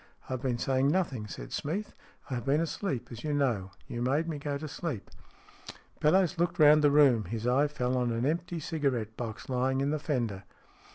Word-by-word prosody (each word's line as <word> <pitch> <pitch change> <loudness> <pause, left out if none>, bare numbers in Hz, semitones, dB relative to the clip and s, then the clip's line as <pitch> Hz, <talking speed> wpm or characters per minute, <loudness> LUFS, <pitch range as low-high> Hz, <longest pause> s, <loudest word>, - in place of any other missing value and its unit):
"I've 130 -2 -3
been 130 -3 0
saying 130 +2 +1
nothing," 145 - 0
said - - -8
Smeath. 195 +8 -3 0.4
"I - - 0
have 120 -2 -2
been 140 +3 +2
asleep, 155 - -2
as 120 -1 -8
you 150 -1 -1
know. 120 -10 +1 0.2
You 120 - -4
made 140 +7 +1
me 155 -3 -3
go 145 0 -2
to 155 +2 -6
sleep." 145 - -5 0.9
Bellowes 170 +2 +3
looked 175 - +1
round 150 0 +7
the 145 - +6
room. 140 -7 +5
His 115 +4 -4
eye 130 +4 +3
fell 130 -3 -1
on 125 -1 +1
an 115 +2 -1
empty 170 +3 -1
cigarette 135 -9 -1
box, 110 -2 -6
lying 130 +1 +1
in 140 +1 +1
the 155 - 0
fender. 120 -10 -2
135 Hz, 195 wpm, -30 LUFS, 120-150 Hz, 0.9 s, round